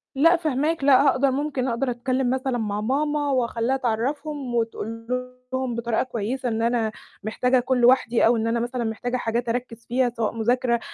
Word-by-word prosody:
لأ، 330 +6 +5
فاهماك. 310 -1 -1
لأ، 275 0 +6
هاقد 265 +2 +3
ممكن 275 -1 0
أقدر 245 +2 0
أتكلِّم 255 +1 -1
مثلًا 260 -1 -1
مع 210 -2 -2
ماما 290 +4 0
وأخلّيها 245 0 0
تعرّفهم 265 +2 -2
وتقول 230 0 -3 0.5
لهم 260 -2 -1
بطريقة 235 -1 0
كويسة 245 +1 -3
إن 225 0 -1
أنا 230 -2 +1 0.3
محتاجة 250 +4 +1
أكون 250 0 +1
لوحدي 245 -1 +4
أو 230 +1 +4
إن 225 - -1
أنا 230 +1 +1
مثلًا 240 +1 -2
محتاجة 245 +3 -2
حاجات 235 +1 -2
أركِّز 235 -1 -4
فيها 245 +1 +2
سواء 225 -1 0
مذاكرة 235 +1 +1
245 Hz, 170 wpm, -24 LUFS, 230-265 Hz, 0.5 s, لأ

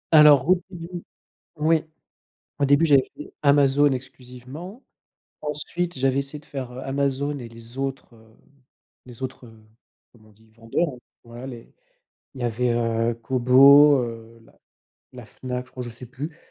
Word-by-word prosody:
Alors, 150 -3 +7
au 180 0 +4
début, 175 -1 -8 0.5
oui, 155 +1 +2 0.8
au - - +3
début, 145 +3 +4
j'avais 140 -3 +5
fait 150 - -11
Amazon 140 0 +4
exclusivement, 130 - -8 0.6
ensuite, 150 +2 -3
j'avais 135 +1 +1
essayé 140 +2 -7
de 145 - -19
faire, 130 -4 -7
heu, 125 - -9
Amazon 140 +1 -1
et 120 - -8
les 115 +1 -14
autres, 135 -2 -5
heu, 110 -1 -21 0.7
les 120 -1 -13
autres, 130 -1 -6
heu, 115 - -15 0.6
comment 110 -2 -21
on - - -21
dit? 110 +1 -26
Vendeurs, 115 +8 -1 0.3
voilà, 120 +3 -9
les 120 -3 -11 0.6
il 130 - -10
y - - -2
avait, 120 +1 0
heu, 115 0 0
Kobo, 135 +4 +6
heu, 115 -1 -8
la - - -24 0.6
la - - -10
Fnac, 125 -1 -6
je 130 - -24
crois, 125 - -6
je 120 - -7
sais 115 +2 -10
plus 145 +7 -8
130 Hz, 160 wpm, -24 LUFS, 120-145 Hz, 0.8 s, Alors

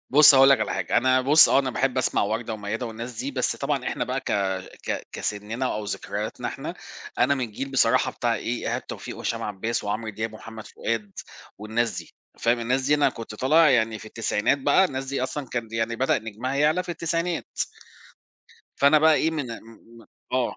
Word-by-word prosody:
بُص 150 +1 +9
هاقول 135 +1 +7
لك 135 - +5
على - - -1
حاجة، - - -1
أنا 130 +2 +4
بُص، 145 +4 +7
آه - - +4
أنا 135 -2 0
باحب 130 +1 0
أسمع - - +1
وردة 110 +2 -2
وميادة 110 +3 -4
والناس 115 +2 -7
دي، 140 - -3
بس 130 -2 0
طبعًا 140 -2 -2
إحنا - - -2
بقى 130 +1 -2
ك - - -4 0.6
ك - - -3
كسننا 110 +5 -3
أو 105 0 -4
ذكرياتنا - - -4
إحنا، - - -6 0.4
أنا 140 - +4
من 130 -2 -2
الجيل 135 +5 -6
بصراحة 135 - +3
بتاع - - 0
إيه، - - -3
إيهاب - - -3
توفيق - - -7
وهشام - - -3
عباس 105 +3 -3
وعمرو 110 +2 -3
دياب 110 +2 -4
ومحمد 110 0 -10
فؤاد 110 -3 -3 0.5
والناس 110 -2 -1
دي، 85 - -9 0.3
فاهم، 120 +1 +1
الناس 125 +3 0
دي 145 +3 +3
أنا 145 - +3
كنت 115 -2 -8
طالع 150 +6 +4
يعني 115 -3 +2
في - - -12
التسعينات 110 +3 0
بقى، 145 +7 +4
الناس 135 -6 -3
دي 135 -1 -3
أصلًا 130 +2 -3
كان 120 -2 -4
يعني 115 +1 -1
بدأ 130 +3 +2
نجمها 110 +4 -5
يعلى 150 +5 +2
في 180 - -16
التسعينات. 170 0 -3 1.2
فأنا 140 +2 +5
بقى 160 +1 +5
إيه، 160 +2 +2
من 150 -4 -3 0.2
م 115 - -15 0.3
م - - -21 0.3
آه. 130 -1 0
125 Hz, 200 wpm, -25 LUFS, 110-140 Hz, 1.2 s, بُص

